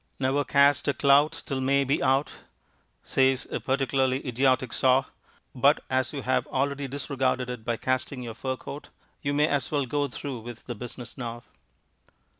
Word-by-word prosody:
"Ne'er 135 Hz, +2 st, +1 dB
cast 140 Hz, -2 st, +4 dB
a 140 Hz, -, +2 dB
clout 140 Hz, +2 st, +4 dB
till 135 Hz, -2 st, -2 dB
May 140 Hz, +1 st, +3 dB
be 140 Hz, +2 st, 0 dB
out" 135 Hz, +2 st, +2 dB, 0.7 s
says 130 Hz, -1 st, +2 dB
a -, -, -1 dB
particularly 135 Hz, 0 st, 0 dB
idiotic 130 Hz, 0 st, +1 dB
saw, 130 Hz, 0 st, +3 dB, 0.5 s
but -, -, +3 dB
as 130 Hz, -1 st, +1 dB
you 140 Hz, -3 st, -5 dB
have 130 Hz, -, +1 dB
already 140 Hz, +1 st, -1 dB
disregarded 130 Hz, -2 st, -1 dB
it 120 Hz, -3 st, -7 dB
by 115 Hz, 0 st, -1 dB
casting 130 Hz, +1 st, -2 dB
your 115 Hz, -2 st, -6 dB
fur 130 Hz, +3 st, -3 dB
coat, 145 Hz, +3 st, -9 dB, 0.3 s
you 140 Hz, -, -1 dB
may 150 Hz, +1 st, +3 dB
as 145 Hz, -3 st, 0 dB
well 145 Hz, -3 st, 0 dB
go 145 Hz, +3 st, 0 dB
through 135 Hz, -1 st, -6 dB
with 120 Hz, +1 st, -9 dB
the 120 Hz, -, -4 dB
business 120 Hz, +2 st, -8 dB
now. 120 Hz, -1 st, -5 dB
130 Hz, 170 wpm, -27 LUFS, 125-140 Hz, 0.7 s, cast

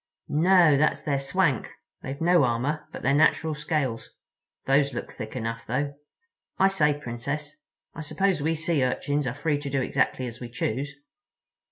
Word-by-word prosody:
"No—that's 160 Hz, -3 st, +4 dB
their 140 Hz, -3 st, 0 dB
swank. 140 Hz, -, +1 dB, 0.3 s
They've 135 Hz, +2 st, -6 dB
no 175 Hz, -1 st, +4 dB
armor 130 Hz, +5 st, -1 dB
but -, -, -8 dB
their 135 Hz, -, +3 dB
natural 155 Hz, +1 st, +3 dB
scales. 150 Hz, -5 st, -2 dB, 0.6 s
Those 140 Hz, +1 st, +2 dB
look -, -, -5 dB
thick -, -, -7 dB
enough, 115 Hz, -1 st, -4 dB
though. 140 Hz, +4 st, -1 dB, 0.6 s
I 195 Hz, -, +5 dB
say, 150 Hz, -7 st, +2 dB
Princess, 145 Hz, -, -5 dB, 0.4 s
I -, -, -7 dB
suppose 190 Hz, +2 st, 0 dB
we 160 Hz, +3 st, +1 dB
Sea 155 Hz, -3 st, +1 dB
Urchins 145 Hz, +2 st, 0 dB
are 125 Hz, -, -3 dB
free 150 Hz, 0 st, 0 dB
to 145 Hz, -1 st, -5 dB
do 135 Hz, 0 st, 0 dB
exactly 130 Hz, 0 st, 0 dB
as 120 Hz, 0 st, -7 dB
we 120 Hz, -, -7 dB
choose?" 130 Hz, +4 st, -3 dB
145 Hz, 160 wpm, -26 LUFS, 130-155 Hz, 0.6 s, I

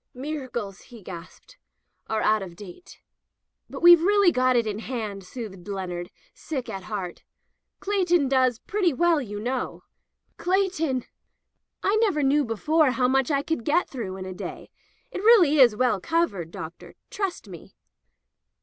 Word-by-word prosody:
"Miracles," 255 Hz, -8 st, -5 dB
he 235 Hz, -5 st, -14 dB
gasped, 180 Hz, -, -11 dB, 0.5 s
"are 220 Hz, -1 st, -1 dB
out 215 Hz, 0 st, +3 dB
of 180 Hz, -3 st, -8 dB
date." 195 Hz, -, -13 dB, 0.3 s
" -, -, -55 dB
But -, -, -8 dB
we've 345 Hz, -1 st, +9 dB
really 400 Hz, 0 st, +4 dB
got 255 Hz, -2 st, +2 dB
it 235 Hz, -1 st, +3 dB
in 210 Hz, -1 st, -3 dB
hand," 220 Hz, -5 st, -5 dB
soothed 195 Hz, -3 st, -9 dB
Leonard, 180 Hz, -3 st, -4 dB, 0.2 s
sick 270 Hz, -6 st, -5 dB
at 190 Hz, -1 st, -6 dB
heart. 190 Hz, -5 st, -5 dB, 0.6 s
"Cleighton 355 Hz, -7 st, +2 dB
does 255 Hz, -3 st, +2 dB
pretty 375 Hz, -, 0 dB
well, 335 Hz, +2 st, +2 dB
you 205 Hz, -5 st, -6 dB
know." 245 Hz, +3 st, -3 dB, 0.5 s
"Cleighton!" 355 Hz, -9 st, 0 dB, 0.8 s
"I 405 Hz, +2 st, +2 dB
never 395 Hz, -10 st, +2 dB
knew 285 Hz, +2 st, +3 dB
before 295 Hz, +6 st, +2 dB
how 255 Hz, 0 st, +1 dB
much 265 Hz, 0 st, +2 dB
I 280 Hz, -2 st, +1 dB
could 320 Hz, -7 st, -2 dB
get 320 Hz, +8 st, +1 dB
through 205 Hz, -8 st, -5 dB
in 185 Hz, -, -6 dB
a 185 Hz, -, -6 dB
day. -, -, -8 dB, 0.4 s
It -, -, -5 dB
really 380 Hz, -10 st, +6 dB
is 240 Hz, -5 st, +7 dB
well 240 Hz, -3 st, +1 dB
covered. 265 Hz, -, -1 dB
Doctor. 165 Hz, 0 st, -9 dB, 0.2 s
Trust 390 Hz, -, -3 dB
me." 175 Hz, -4 st, -12 dB
255 Hz, 155 wpm, -25 LUFS, 205-330 Hz, 0.8 s, we've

